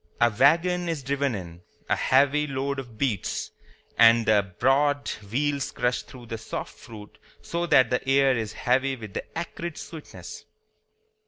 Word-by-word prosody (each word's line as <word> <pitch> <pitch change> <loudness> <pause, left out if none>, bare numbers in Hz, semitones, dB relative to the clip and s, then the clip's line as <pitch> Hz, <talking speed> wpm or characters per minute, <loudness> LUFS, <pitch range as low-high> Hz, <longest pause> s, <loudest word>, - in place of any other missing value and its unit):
A 120 0 +4
wagon 170 - +3
is 155 -4 -3
driven 140 -1 -1
in, 85 -3 -8 0.3
a - - +2
heavy 145 +2 +3
load 135 0 -2
of 120 -4 -10
beets, 110 -7 -2 0.5
and 115 0 +7
the 100 -4 +2
broad 145 +2 +2 0.2
wheels 140 +2 0
crush 125 0 0
through 125 -2 -13
the 115 -1 -6
soft 110 - -6
fruit 105 -1 -13 0.2
so 170 0 -2
that 130 -6 +5
the 125 +2 -1
air 135 -1 +4
is 110 -2 -3
heavy 135 +2 +1
with 110 -5 -10
the - - -6
acrid 170 0 -5
sweetness. 160 -3 -10
135 Hz, 155 wpm, -26 LUFS, 115-145 Hz, 0.5 s, and